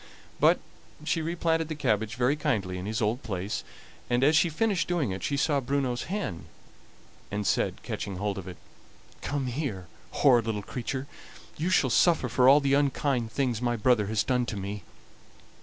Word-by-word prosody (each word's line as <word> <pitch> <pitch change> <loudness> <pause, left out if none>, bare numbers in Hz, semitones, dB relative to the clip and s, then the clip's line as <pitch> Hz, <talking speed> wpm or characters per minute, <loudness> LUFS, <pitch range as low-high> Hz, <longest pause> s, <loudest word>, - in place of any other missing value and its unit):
But - - +5 0.4
she 155 +2 0
replanted 165 0 0
the 155 - -4
cabbage 110 -6 0
very 125 +4 +2
kindly 110 - -1
in 90 - -5
his 110 +1 -1
old 110 +5 0
place, 95 0 -3 0.5
and, 120 +1 +2
as 150 +3 +5
she 165 +2 +4
finished 195 +3 0
doing 170 - 0
it, 95 - -5
she 140 - -1
saw 140 +1 +2
Bruno's 135 -2 -1
hen, 190 - -4 0.8
and 105 0 -3
said, - - 0
catching 100 - -4
hold 100 +1 -2
of 95 - -9
it: 90 - -8 0.6
"Come 140 0 -2
here, 125 - -3 0.2
horrid 120 -5 +4
little 105 -2 -2
creature! 130 +4 -4 0.5
you 165 +4 -1
shall 135 -8 +3
suffer 170 +5 +3
for 130 0 +5
all 140 +2 +8
the 140 -1 +1
unkind 140 -4 +1
things 125 -2 -1
my 120 -1 +1
brother 110 -2 +2
has 110 -1 +1
done 125 -2 0
to 110 - -4
me." 100 +1 -5
125 Hz, 175 wpm, -28 LUFS, 105-145 Hz, 0.8 s, all